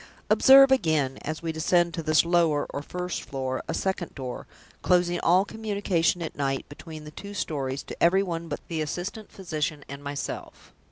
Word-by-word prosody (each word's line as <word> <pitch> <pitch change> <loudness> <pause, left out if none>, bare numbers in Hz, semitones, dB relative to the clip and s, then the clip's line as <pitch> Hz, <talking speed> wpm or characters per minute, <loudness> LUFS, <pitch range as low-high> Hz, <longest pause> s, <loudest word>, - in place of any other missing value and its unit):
Observe, 270 0 +8
again, 155 - +2
as 155 +3 -5
we 165 - -1
descend 170 +2 +2
to 165 - -3
this 155 +1 +3
lower, 170 -4 +2
or 140 - -4
first 180 +4 -4
floor, 130 -1 -3
a - - -2
second 190 -3 -2
door, 130 -3 -6 0.3
closing 175 -1 +2
all 185 +3 +4
communication 200 -6 0
at 160 - -6
night 135 -1 -2
between 155 +1 -10
the 150 - -10
two 200 +6 -9
stories 140 -6 -3
to - - -8
every 190 +3 +5
one 170 -3 -4
but - - -5
the 160 -2 -2
assistant 180 +8 -5
physician 155 -5 -3
and 140 +1 -8
myself. 145 -1 -6
165 Hz, 175 wpm, -26 LUFS, 145-180 Hz, 0.3 s, Observe